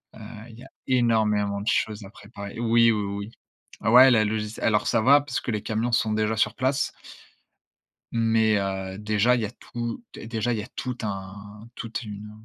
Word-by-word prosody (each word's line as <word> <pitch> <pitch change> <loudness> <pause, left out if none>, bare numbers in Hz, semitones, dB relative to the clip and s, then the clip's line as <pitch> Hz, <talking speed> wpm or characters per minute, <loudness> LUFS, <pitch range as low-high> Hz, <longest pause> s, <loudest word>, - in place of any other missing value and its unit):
heu, - - -13 0.3
il 115 +1 -14
y - - -11
a - - -14 0.2
énormément 105 -5 +1
de 105 - -8
choses 105 -1 0
à - - -11
préparer. 100 0 -10
Oui, 115 0 +4
oui, 105 -1 0
oui, 100 +2 -5 0.6
ouais, 130 +2 +9
la 110 -3 +4
logist 105 0 -3
alors 105 -2 +1
ça 115 -2 +2
va 140 +4 +6
parce 145 -3 -4
que - - -4
les 105 -2 -2
camions 115 +2 -2
sont 110 -2 +2
déjà 110 +1 0
sur - - +1
place 130 +2 0 1.2
mais 115 -2 +2
heu, 95 -1 -4
déjà 105 +3 +2
il 120 - -1
y - - -1
a 105 - -6
tout 120 - -6
dé 110 - -9
déjà, 115 +1 -1
il 110 - -2
y - - -4
a - - -10
tout 125 -1 -4
un 100 +2 -7
toute 115 +1 -5
une 105 -1 -8
110 Hz, 205 wpm, -25 LUFS, 105-120 Hz, 1.2 s, ouais